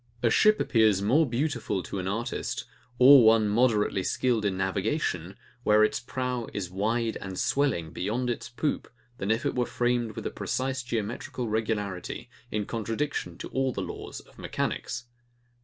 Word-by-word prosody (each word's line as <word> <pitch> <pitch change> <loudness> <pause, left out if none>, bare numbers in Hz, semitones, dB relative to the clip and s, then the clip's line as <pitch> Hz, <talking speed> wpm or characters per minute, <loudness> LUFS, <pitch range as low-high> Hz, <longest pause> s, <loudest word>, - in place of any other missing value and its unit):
A 115 - +4
ship 215 - +5
appears 110 -4 +3
more 130 +9 +3
beautiful 125 - -1
to 100 - -5
an 90 - -3
artist, 115 +5 -3 0.3
or 130 +1 +9
one 110 -1 +5
moderately 105 -3 +2
skilled 115 +2 +1
in 95 -2 0
navigation, 95 - -1 0.2
where 105 -2 +5
its 110 - +2
prow 125 -1 -3
is 90 -3 -3
wide 110 +4 0
and 95 -1 -6
swelling 125 - +1
beyond 110 +9 -2
its 120 0 -3
poop, 140 +5 -2 0.3
than 95 - -2
if 115 +6 +1
it - - +1
were 125 -1 0
framed 120 -2 0
with - - -6
a - - -2
precise 130 0 -2
geometrical 120 +1 -3
regularity, 105 -4 -2 0.2
in 105 -1 -2
contradiction 115 - -3
to - - -7
all 135 0 0
the - - -3
laws - - -7
of - - -21
mechanics. 120 - -3
115 Hz, 160 wpm, -28 LUFS, 100-125 Hz, 0.3 s, or